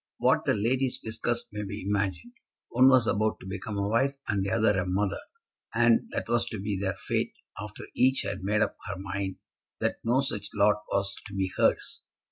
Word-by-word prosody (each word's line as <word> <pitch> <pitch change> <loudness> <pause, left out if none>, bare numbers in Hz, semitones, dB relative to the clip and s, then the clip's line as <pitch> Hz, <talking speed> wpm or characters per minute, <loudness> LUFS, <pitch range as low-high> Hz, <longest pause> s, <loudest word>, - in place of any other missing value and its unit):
What - - +3
the - - +3
ladies 125 +5 +1
discussed 115 +2 -3
may 105 0 -4
be 100 -1 -5
imagined. 100 - -1 0.4
One 130 +2 +6
was 130 -3 +5
about 110 0 +1
to - - -12
become 100 +2 -5
a 100 0 0
wife 135 +6 +1
and 100 -2 +1
the 100 - -1
other 105 -2 +3
a 90 - -1
mother, 95 +2 0 0.6
and 120 -1 +4
that - - -3
was 120 0 +2
to 110 - -4
be 100 +1 -2
their 95 -1 -1
fate 95 - -1 0.3
after 105 0 -7
each 130 +1 +3
had - - -4
made 105 +2 +2
up - - -3
her 100 -2 -4
mind 95 0 -3 0.4
that - - 0
no 120 +4 +3
such 130 -7 -2
lot 105 +1 +4
was 100 0 0
to 100 - -9
be 95 -1 0
hers. - - +1
105 Hz, 200 wpm, -28 LUFS, 100-115 Hz, 0.6 s, One